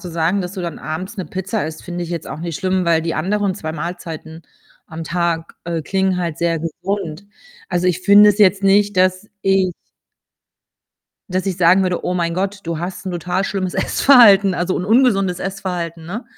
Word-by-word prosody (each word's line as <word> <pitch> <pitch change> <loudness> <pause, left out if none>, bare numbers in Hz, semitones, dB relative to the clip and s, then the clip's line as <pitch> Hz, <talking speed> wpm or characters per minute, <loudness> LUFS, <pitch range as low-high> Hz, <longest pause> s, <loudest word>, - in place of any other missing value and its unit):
zu 180 - -8
sagen, 170 +4 0
dass 180 -1 -5
du 190 -2 -5
dann 170 -3 -5
abends 185 +7 -6
'ne 190 - -4
Pizza 190 0 -3
isst, 155 0 -8
finde 175 0 -5
ich 170 - -8
jetzt 170 -2 -4
auch - - -7
nicht 170 -2 -4
schlimm, 185 -1 0
weil 165 -1 +2
die 165 0 -2
anderen 195 +4 0
2 160 -4 -5
Mahlzeiten 160 0 -7 0.4
am 160 +1 -7
Tag, 170 -1 -2
äh, 165 -1 -3
klingen 190 +2 0
halt 170 -3 -3
sehr 170 -1 0
gesund. 170 +2 -4 0.4
Also, 180 0 0
ich 180 0 +1
finde 205 +2 +7
es 205 - -3
jetzt 200 -1 +4
nicht, 200 +1 +3
dass 185 +2 +1
ich 190 -2 +2 1.6
dass 185 +1 -2
ich 190 -3 -1
sagen 180 +2 +5
würde: 180 -2 -1
„Oh - - -1
mein 170 -1 -1
Gott, 195 +2 -2
du 165 -1 -3
hast 180 +3 -6
'n 185 - -2
total 180 +2 -2
schlimmes 190 -2 -3
Essverhalten, 205 -8 +5
also, 180 +1 -1
un 180 - -2
ungesundes 200 -5 +3
Essverhalten, 180 -4 -4
ne?“ 205 +8 -6
180 Hz, 195 wpm, -19 LUFS, 170-195 Hz, 1.6 s, finde